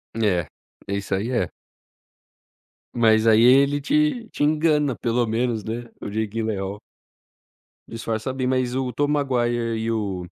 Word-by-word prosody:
É, 100 -7 +1 0.4
isso 100 0 -2
aí 110 +6 -2
é. 120 - 0 1.5
Mas 110 -1 +4
aí 110 0 +6
ele 140 +4 +5
te 285 - +1
te - - -3
engana 150 -3 +2
pelo 120 0 0
menos, 115 0 -1
né, 120 +2 -5
o - - -6
Jake 110 +1 -1
Gyllenhaal 105 -2 -3 1.1
disfarça 115 +2 -3
bem. 130 -1 -2
Mas 130 -1 0
o 130 -1 -1
Tobey 145 +4 0
Maguire 120 -5 0
e 110 +1 -2
o 100 -5 -2
120 Hz, 140 wpm, -23 LUFS, 110-135 Hz, 1.5 s, aí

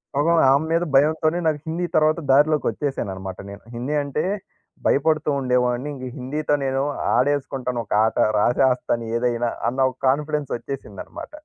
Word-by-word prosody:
పాపం 165 +4 +3
ఆమె 140 +3 +3
మీద 165 +1 +2
భయంతోనే 155 +4 +3
నాకు 155 -2 +1
హిందీ 170 +2 -2
తర్వాత 155 +2 +3
దారిలోకి 150 +1 +4
వచ్చేసానన్నమాట 95 -8 -4
నేను. 100 - -11
హిందీ 125 +5 -3
అంటే 140 +2 -2 0.6
భయపడుతూ 155 +1 +2
ఉండేవాడిని 125 +1 0
ఇంగ 130 -2 -7
హిందీతో 145 +4 -2
నేను 135 0 0 0.3
ఆడేసుకుంటాను 130 -2 0
ఒక - - -4
ఆట. 110 - -1 0.2
రాసేస్తాను 125 0 +1
ఏదైనా 120 0 0 0.2
అన్న 130 +2 -5
ఒక 130 - -21
కాన్ఫిడెన్స్ 150 +1 -1
వచ్చేసిందన్నమాట. 120 -7 -8
135 Hz, 135 wpm, -22 LUFS, 125-150 Hz, 0.6 s, దారిలోకి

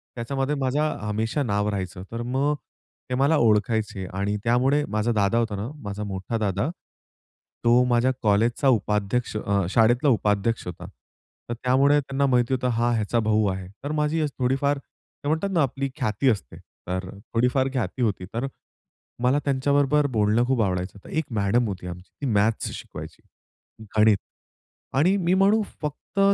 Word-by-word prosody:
त्याच्यामध्ये 135 +4 -1
माझं 145 +3 0
हमेशा 110 +7 -1
नाव 105 -3 0
राहायचं. 95 -2 -4
तर 115 +1 -4
मग 135 +4 0 0.5
ते 125 - 0
मला 140 +5 +3
ओळखायचे 105 -3 +1
आणि 100 +2 -1
त्यामुळे 130 +5 +3
माझा 110 +3 0
दादा 105 0 +2
होता 115 -3 0
ना, 100 +3 -4 0.2
माझा 100 +1 -4
मोठा 95 +3 -3
दादा, 105 - 0 0.9
तो 120 +1 +5
माझ्या 125 +1 +3
कॉलेजचा 115 +6 +2
उपाध्यक्ष 105 +1 0
अ, 100 -2 0
शाळेतला 120 +6 +4
उपाध्यक्ष 105 -1 +1
होता. 90 - -7 0.6
तर - - -1
त्यामुळे 140 +3 +4
त्यांना 140 0 -1
माहिती 125 0 +2
होतं 125 0 0
हा 120 +1 +2
ह्याचा 110 +2 0
भाऊ 110 -1 +2
आहे. 95 -1 -6 0.2
तर 145 - -3
माझी 155 +1 +1
थोडीफार 135 +3 +1
ते 145 - -13
म्हणतात 160 +6 0
ना 165 - +3
आपली 135 +1 -2
ख्याती 125 0 +1
असते, 100 - -2
तर 95 +1 -6 0.2
थोडीफार 125 +3 +2
ख्याती 125 -1 -2
होती. 105 -5 0
तर 120 +4 -1 0.8
मला 130 +4 +3
त्यांच्याबरोबर 140 +1 +2
बोलणं 105 +3 +3
खूप 130 -4 +2
आवडायचं. 90 +1 -2
एक 160 -1 -1
मॅडम 110 +3 +2
होती 95 -3 -5
आमची 90 +1 -8
ती 140 - -2
मॅथ्स 105 +2 +1
शिकवायची, - - -9 0.8
गणित 105 -1 +6 0.8
आणि 170 +8 +4
मी 180 -1 +1
म्हणू 200 +3 +4 0.2
फक्त 150 +6 -5
120 Hz, 155 wpm, -25 LUFS, 105-140 Hz, 0.9 s, गणित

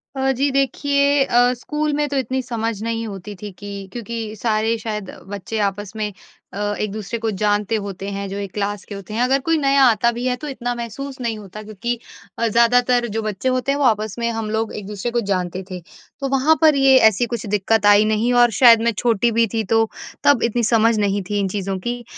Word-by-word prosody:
अ, 265 0 +1
जी। 280 +3 +1
देखिए, 280 +1 +2
अ, 245 0 +3
स्कूल 300 +4 -2
में 295 0 0
तो 280 - -2
इतनी 260 +1 -1
समझ 230 -3 -3
नहीं 230 0 -2
होती 200 0 -8
थी 205 -1 -6
कि 205 0 -7 0.2
क्योंकि 230 -2 -5
सारे 220 +1 0
शायद 210 -3 -5 0.3
बच्चे 215 +3 -5
आपस 205 0 -9
में 210 -1 -2 0.4
अ, 205 +1 -2
एक-दूसरे 215 +2 -4
को 225 - +1
जानते 210 +1 +1
होते 195 -1 -6
हैं 200 0 -4
जो 200 - -5
1 200 -2 -5
क्लास 205 0 -3
के 200 - -6
होते 200 +1 -9
हैं। 235 - -1
अगर 265 +2 +2
कोई 325 -1 +3
नया 275 -1 +3
आता 235 +1 +3
भी 240 +2 -5
है 250 - +1
तो - - -3
इतना 245 -3 -3
महसूस 260 +4 -6
नहीं 230 -2 -2
होता 210 +1 -10
क्योंकि 215 +3 -3 0.5
अ, 230 - +2
ज़्यादातर 240 +2 +3
जो 225 - 0
बच्चे 215 +4 -2
होते 255 +2 0
हैं 280 - 0
वो 280 - +2
आपस 215 -3 +1
में 235 0 0
हम 225 -1 -4
लोग 220 0 -2
एक-दूसरे 210 +2 -5
को 240 - +1
जानते 180 0 -2
थे। 180 -1 -6 0.4
तो 275 - -2
वहाँ 275 +4 +3
पर 310 -2 +6
ये 270 -1 +5
ऐसी 230 +4 -1
कुछ 235 -1 -5
दिक्कत 210 +1 +1
आई 205 +1 +6
नहीं 220 +3 +1
और 240 - +3
शायद 230 +1 +6
मैं 235 0 +2
छोटी 235 0 +2
भी 230 +1 +3
थी, 225 -1 0
तो 225 +2 +2 0.3
तब 285 -5 +4
इतनी 235 +1 0
समझ 225 0 +3
नहीं 200 0 +1
थी 205 - 0
इन 195 - 0
चीज़ों 195 0 -3
की। 240 +4 -4
225 Hz, 220 wpm, -20 LUFS, 205-245 Hz, 0.5 s, पर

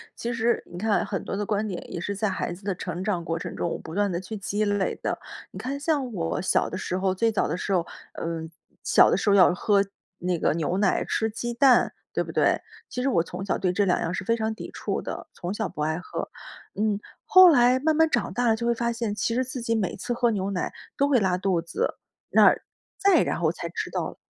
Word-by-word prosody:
其 235 +1 -3
实 230 +1 +1
你 - - -13
看 215 +2 +1
很 195 - -3
多 195 - -4
的 205 - -1
观 210 +1 0
点 185 -3 -6
也 - - -3
是 200 +3 -3
在 215 +2 0
孩 185 - -2
子 175 +4 -9
的 195 -1 -1
成 180 0 -5
长 185 -5 -1
过 165 0 -2
程 - - -6
中， 175 - -1
我 - - -3
不 160 - -10
断 205 -1 +1
地 170 - -1
去 190 +4 -7
积 205 +2 -1
累 205 -2 0
的。 - - -1 0.3
你 - - -9
看 275 +2 -3
像 285 -5 0
我 165 -4 -2
小 185 - +2
的 - - -5
时 185 - -2
候， 190 0 +1
最 225 +4 +1
早 210 - +1
的 - - -1
时 195 - -4
候， 175 -2 +2 0.3
嗯， 165 -1 -4 0.3
小 - - +5
的 - - +4
时 - - 0
候 200 - +5
要 180 -2 +6
喝 200 +2 +2 0.3
那 175 -2 -1
个 - - +2
牛 170 +3 -1
奶、 200 -2 +2
吃 220 - 0
鸡 235 +2 -4
蛋， 260 0 +4 0.2
对 - - 0
不 - - -8
对？ - - +3 0.3
其 250 - -3
实 - - +1
我 170 -7 +3
从 180 +3 -6
小 190 - 0
对 185 -2 +1
这 200 +2 +1
两 180 - +2
样 165 - -1
儿 - - -3
是 190 - -4
非 230 - +2
常 220 -1 -1
抵 - - -8
触 - - -2
的， - - -6
从 175 +2 -4
小 - - -2
不 150 - -7
爱 155 +2 0
喝。 185 - -5 0.5
嗯， 210 -1 0 0.2
后 370 -1 +8
来 250 -2 +5
慢 310 +3 +2
慢 320 0 +4
长 - - 0
大 245 0 +1
了 225 - +4
就 235 +1 -4
会 235 - +3
发 235 0 -1
现， 230 -2 -2
其 230 +2 -1
实 255 +1 +1
自 255 -1 -5
己 230 0 0
每 205 -5 -1
次 245 - -5
喝 240 -1 +2
牛 195 -1 -1
奶 185 -2 -2 0.2
都 280 - +3
会 275 -4 +4
拉 185 -3 +1
肚 185 -3 +1
子， 450 - -2 0.3
那 - - +7 0.5
再 400 -1 +5
然 - - -2
后 - - +2
才 - - -6
知 - - -4
道 - - -3
205 Hz, 275 characters per minute, -26 LUFS, 180-235 Hz, 0.5 s, 后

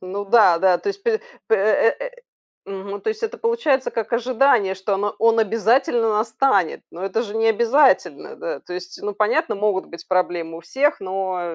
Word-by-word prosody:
Ну 195 +2 -5
да 195 -5 +5
да. 185 -1 +3
То - - -5
есть 400 0 -5
пль 455 -2 +1 0.3
п 220 - +3
э, - - +2 0.3
э, - - -6
э, - - -8 0.6
э, - - -9
мгм, 195 +1 -6
то - - -4
есть 440 +1 -3
это 455 +2 -4
получается 460 - 0
как 225 0 -4
ожидание, 240 -4 +2
что 190 +2 -2
оно 205 +1 -2
он 230 +1 +3
обязательно 225 +2 +2
настанет, 220 -4 +1
но 180 +3 -7
это 220 +4 -1
же 215 -1 -6
не 225 0 +1
обязательно, 235 +6 +2
да. - - -5
То 180 - -11
есть, 180 0 -8
ну, 205 -1 -4
понятно, 215 - +1
могут 200 -2 -1
быть 170 0 -12
проблемы 175 -3 -1
у - - -11
всех, 275 - 0
но 190 -1 -3
215 Hz, 205 wpm, -21 LUFS, 190-260 Hz, 0.6 s, да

